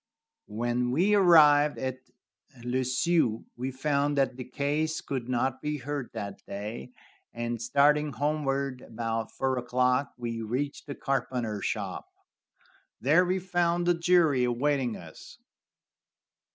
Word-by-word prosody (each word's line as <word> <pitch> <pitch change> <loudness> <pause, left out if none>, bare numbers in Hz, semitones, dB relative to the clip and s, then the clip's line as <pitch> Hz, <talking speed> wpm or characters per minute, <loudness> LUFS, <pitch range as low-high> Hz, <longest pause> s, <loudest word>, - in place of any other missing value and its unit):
When 120 +3 -1
we 175 +11 +2
arrived 150 -6 +6
at 130 0 -3 0.6
Le 125 +2 0
Sueur 130 -2 +1
we 125 +2 -3
found 140 +2 0
that 135 -2 +1
the 125 -1 -7
case 150 +4 -1
could 130 -3 -5
not 130 +1 0
be 150 0 -2
heard 140 -1 -4
that 100 -3 -6
day, 105 +5 -6 0.4
and, 120 -1 -3
starting 145 +4 +3
homeward, 140 -1 -1
about 115 -1 -3
four 130 -1 -1
o'clock 125 +2 0
we 115 -2 -4
reached 130 +7 -3
the 140 - -5
carpenter 120 -6 -2
shop. - - -3 0.9
There 155 +8 +4
we 185 +1 0
found 175 -2 0
the 175 - +4
jury 170 -6 +3
awaiting 125 0 0
us. 80 -2 -13
135 Hz, 125 wpm, -28 LUFS, 120-150 Hz, 0.9 s, arrived